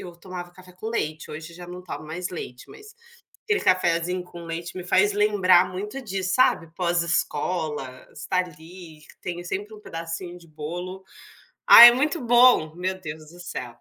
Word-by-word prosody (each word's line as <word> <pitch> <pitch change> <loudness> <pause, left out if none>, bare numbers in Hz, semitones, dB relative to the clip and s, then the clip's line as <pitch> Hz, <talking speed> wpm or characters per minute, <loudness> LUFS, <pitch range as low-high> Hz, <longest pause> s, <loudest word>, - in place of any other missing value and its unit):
eu 175 - -9
tomava 175 0 -8
café 185 0 -16
com 185 +5 -7
leite, 155 -9 -3
hoje 160 +2 -9
já 175 0 -10
não 180 +1 -9
tomo 170 -3 -8
mais 175 +4 -5
leite, 125 -8 -8
mas 425 +2 -14 0.5
aquele 430 -2 0
cafezinho 180 0 +1
com 170 -1 -11
leite 170 +2 -6
me 180 - -6
faz 200 +3 +3
lembrar 205 -4 +4
muito 210 +8 -6
disso 190 -4 -2
sabe, 255 -9 +3
pós-escola, 170 -5 -2
você - - -23
está 185 - -1
ali, 170 -2 -6
que - - -18
tem 175 -1 -5
sempre 205 +4 -5
um 210 - -14
pedacinho 165 +1 -6
de 170 - -18
bolo, 175 +5 -7 0.6
ah - - +11
é 240 - +11
muito 300 +6 0
bom, 240 -9 +5
meu 185 +1 -3
Deus 155 -2 -9
do 175 - -14
céu. 125 -8 -7
180 Hz, 180 wpm, -24 LUFS, 165-190 Hz, 0.6 s, ah